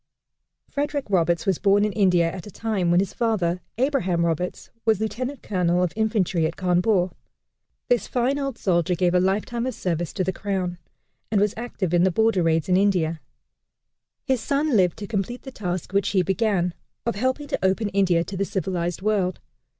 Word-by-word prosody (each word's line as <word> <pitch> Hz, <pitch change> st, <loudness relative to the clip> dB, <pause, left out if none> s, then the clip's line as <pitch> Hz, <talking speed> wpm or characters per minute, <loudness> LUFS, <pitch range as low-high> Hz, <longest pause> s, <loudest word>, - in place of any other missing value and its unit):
Frederick 285 Hz, -1 st, -2 dB
Roberts 170 Hz, -2 st, +2 dB
was 190 Hz, -4 st, +1 dB
born 205 Hz, +1 st, +4 dB
in 210 Hz, -, 0 dB
India 180 Hz, -5 st, +3 dB
at 185 Hz, +2 st, -8 dB
a -, -, -7 dB
time 205 Hz, -3 st, -1 dB
when 175 Hz, +1 st, +4 dB
his 195 Hz, -, -1 dB
father, 185 Hz, -7 st, 0 dB, 0.2 s
Abraham 230 Hz, -11 st, +1 dB
Roberts, 170 Hz, +2 st, -3 dB
was 220 Hz, -3 st, +2 dB
lieutenant 245 Hz, +5 st, -3 dB
colonel 180 Hz, -2 st, +1 dB
of 180 Hz, -, -1 dB
infantry 210 Hz, -7 st, +1 dB
at 165 Hz, -, -6 dB
Cawnpore. 180 Hz, +1 st, +2 dB, 0.8 s
This 245 Hz, -5 st, +2 dB
fine 255 Hz, +3 st, 0 dB
old 275 Hz, -3 st, -3 dB
soldier 180 Hz, -1 st, +1 dB
gave 180 Hz, 0 st, +1 dB
a 180 Hz, -, +4 dB
life 190 Hz, +3 st, +1 dB
time 235 Hz, +1 st, -3 dB
of 255 Hz, -, -3 dB
service 175 Hz, -2 st, -2 dB
to 190 Hz, -, -1 dB
the 190 Hz, +1 st, -1 dB
crown, 185 Hz, -3 st, -3 dB, 0.5 s
and 210 Hz, -, +2 dB
was 205 Hz, 0 st, +2 dB
active 215 Hz, -7 st, -3 dB
in 175 Hz, 0 st, +4 dB
the 190 Hz, -, +4 dB
border 220 Hz, +1 st, +2 dB
raids 165 Hz, -2 st, +1 dB
in 180 Hz, -1 st, +3 dB
India. 175 Hz, -5 st, +1 dB, 1.0 s
His 260 Hz, -3 st, +1 dB
son 280 Hz, +2 st, +1 dB
lived 180 Hz, -4 st, +3 dB
to 205 Hz, -, -6 dB
complete 210 Hz, +4 st, -3 dB
the 265 Hz, -, -8 dB
task 180 Hz, -5 st, -4 dB
which 200 Hz, 0 st, +2 dB
he 190 Hz, -2 st, +2 dB
began, 190 Hz, -2 st, +1 dB, 0.3 s
of 235 Hz, -, 0 dB
helping 260 Hz, +7 st, -1 dB
to -, -, -2 dB
open 195 Hz, +3 st, +1 dB
India 185 Hz, -4 st, +2 dB
to 195 Hz, -, -7 dB
the 195 Hz, -, 0 dB
civilized 185 Hz, -2 st, -2 dB
world. 195 Hz, -4 st, +1 dB
190 Hz, 190 wpm, -24 LUFS, 175-220 Hz, 1.0 s, born